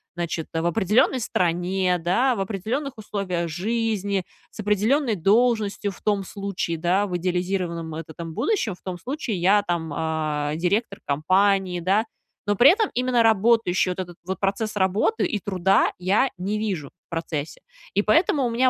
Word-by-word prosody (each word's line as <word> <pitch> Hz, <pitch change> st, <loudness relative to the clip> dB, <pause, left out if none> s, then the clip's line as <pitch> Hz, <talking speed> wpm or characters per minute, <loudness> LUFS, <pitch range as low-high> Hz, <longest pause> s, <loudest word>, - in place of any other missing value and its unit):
значит, 170 Hz, -2 st, -3 dB
э, 165 Hz, -, 0 dB
в -, -, -3 dB
определенной 220 Hz, +6 st, +2 dB
стране, 180 Hz, -1 st, 0 dB
да, 235 Hz, +10 st, +2 dB
в 195 Hz, -, -2 dB
определенных 225 Hz, +8 st, -3 dB
условиях 185 Hz, -5 st, -3 dB
жизни, 200 Hz, +1 st, -1 dB, 0.3 s
с -, -, -16 dB
определенной 220 Hz, +5 st, +2 dB
должностью, 210 Hz, +1 st, +2 dB
в -, -, -15 dB
том 205 Hz, -2 st, +1 dB
случае, 195 Hz, -4 st, -4 dB
да, 185 Hz, +5 st, +1 dB
в 180 Hz, -1 st, -2 dB
идеализированном 180 Hz, -2 st, -2 dB
вот 160 Hz, 0 st, -6 dB
этом 165 Hz, 0 st, -7 dB
будущем, 375 Hz, -, 0 dB
в -, -, -28 dB
том 185 Hz, -2 st, -5 dB
случае, 260 Hz, -, -3 dB
я 200 Hz, +4 st, +4 dB
там, 165 Hz, -3 st, -2 dB
а, 155 Hz, -2 st, -1 dB
директор 195 Hz, +5 st, -1 dB
компании, 185 Hz, +5 st, +2 dB
да. 200 Hz, +6 st, +2 dB, 0.4 s
Но 205 Hz, -, +2 dB
при 250 Hz, +8 st, +7 dB
этом 430 Hz, +1 st, +1 dB
именно 250 Hz, -1 st, +2 dB
работающей, 220 Hz, -4 st, +3 dB
вот 180 Hz, -, -4 dB
этот 175 Hz, -2 st, -6 dB
вот 190 Hz, -1 st, -4 dB
процесс 205 Hz, +2 st, -1 dB
работы, 200 Hz, -, +1 dB
и 210 Hz, -, -1 dB
труда 190 Hz, 0 st, +2 dB
я 195 Hz, +9 st, +2 dB
не 200 Hz, +4 st, -2 dB
вижу, 185 Hz, -10 st, -3 dB, 0.2 s
в -, -, -86 dB
процессе. 160 Hz, -2 st, -4 dB, 0.3 s
И 205 Hz, -, +3 dB
поэтому 285 Hz, -, +3 dB
у -, -, 0 dB
меня 255 Hz, +2 st, +3 dB
195 Hz, 165 wpm, -24 LUFS, 175-220 Hz, 0.4 s, при